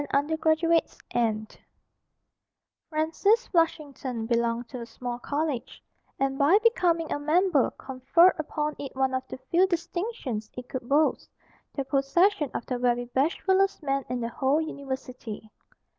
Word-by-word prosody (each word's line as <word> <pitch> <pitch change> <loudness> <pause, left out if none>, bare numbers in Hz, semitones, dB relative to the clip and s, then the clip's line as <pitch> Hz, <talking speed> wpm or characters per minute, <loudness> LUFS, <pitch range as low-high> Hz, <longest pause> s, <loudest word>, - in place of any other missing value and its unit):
_ 285 +2 +2
[Illustration: 320 +1 +3 0.3
F] 220 -2 -1 1.3
Francis 330 +9 +2
Flushington 285 - -1
belonged 235 0 0
to 250 -3 -7
a - - -5
small 240 +1 -5
college, 290 -1 -3 0.3
and 270 0 -1
by 295 +8 +6
becoming 345 -8 +2
a - - -2
member 310 -1 +3
conferred 275 +8 +3
upon 300 -1 -2
it 275 -2 -7
one 265 0 +1
of 260 - 0
the - - -7
few 360 +3 +5
distinctions 340 - -3
it 250 0 -7
could 255 -2 -6
boast 300 +2 +2 0.5
the 275 - -2
possession 295 +4 +2
of - - -3
the 250 -1 -3
very 245 0 +1
bashfulest 380 +7 +1
man 275 -1 0
in 250 0 -2
the 230 -1 -2
whole 270 +5 +1
university. 260 -7 -6
280 Hz, 140 wpm, -27 LUFS, 250-330 Hz, 1.3 s, by